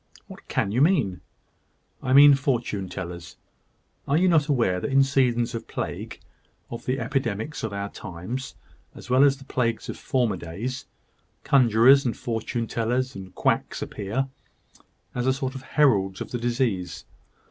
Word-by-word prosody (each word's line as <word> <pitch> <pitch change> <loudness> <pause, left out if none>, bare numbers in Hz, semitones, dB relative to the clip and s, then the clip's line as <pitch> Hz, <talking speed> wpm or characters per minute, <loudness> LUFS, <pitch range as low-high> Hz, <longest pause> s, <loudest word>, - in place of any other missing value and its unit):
"What - - -13
can 100 - -1
you 120 +5 +1
mean?" 140 - +2 0.8
"I 125 - -2
mean 140 +2 +9
fortune 120 -8 -1
tellers. 85 -2 -7 0.7
Are 140 - +2
you 185 +3 +3
not 160 -4 +3
aware 115 - +1
that 90 - -3
in 135 0 +5
seasons 125 -3 +1
of 115 -1 -6
plague - - -5 0.5
of 115 - -7
the 130 +2 0
epidemics 125 +1 -2
of 110 - -3
our 100 0 -3
times, 100 +8 -7 0.4
as - - -10
well 130 +2 +6
as 140 -1 +4
the 135 - -13
plagues 115 -4 -1
of - - -5
former 120 -7 0
days 100 +11 -6 0.6
conjurors, 130 +1 +5
and 120 - -2
fortune 115 0 -3
tellers, 125 +3 -1
and 95 -1 -10
quacks - - 0
appear, 110 +7 -3 0.9
as 125 +1 -2
a 130 - +4
sort 130 -1 -3
of 135 - -7
heralds 105 -10 +2
of - - -6
the 120 - -2
disease? 115 -8 -1
120 Hz, 160 wpm, -25 LUFS, 100-135 Hz, 0.9 s, mean